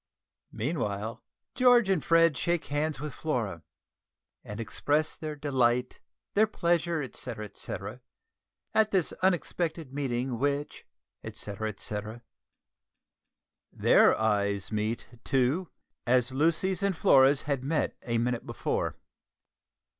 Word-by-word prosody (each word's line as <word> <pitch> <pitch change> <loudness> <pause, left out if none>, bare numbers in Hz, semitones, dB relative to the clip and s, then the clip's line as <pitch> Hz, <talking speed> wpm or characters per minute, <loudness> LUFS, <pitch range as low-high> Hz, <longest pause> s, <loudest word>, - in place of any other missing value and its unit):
Meanwhile 110 -4 -3 0.3
George 245 -4 +5
and 190 -6 +1
Fred 165 -2 +4
shake 170 +4 -1
hands 150 -1 0
with 150 -1 -5
Flora, 115 - -2 0.8
and 105 +2 -8
express 145 +7 0
their 155 -2 -5
"delight, 125 -4 +1 0.3
their 215 +2 +4
pleasure, 170 -5 0
etcetera, 115 -4 -5 0.7
at 220 -1 +4
this 190 -5 +1
unexpected 170 -5 -1
meeting 130 -3 -2
which, 145 +1 -2 0.4
etcetera, 105 +1 -5
etcetera." 110 +2 -4 1.5
Their - - +4
eyes 100 -2 0
meet, 110 +2 -2 0.2
too, 135 +7 +1 0.4
as 125 0 +3
Lucy's 165 +7 +1
and 200 -3 0
Flora's 135 0 +5
had 140 -4 -2
met 150 +3 0
a 115 -1 -1
minute 120 0 -1
before. - - -2
140 Hz, 105 wpm, -29 LUFS, 115-165 Hz, 1.5 s, George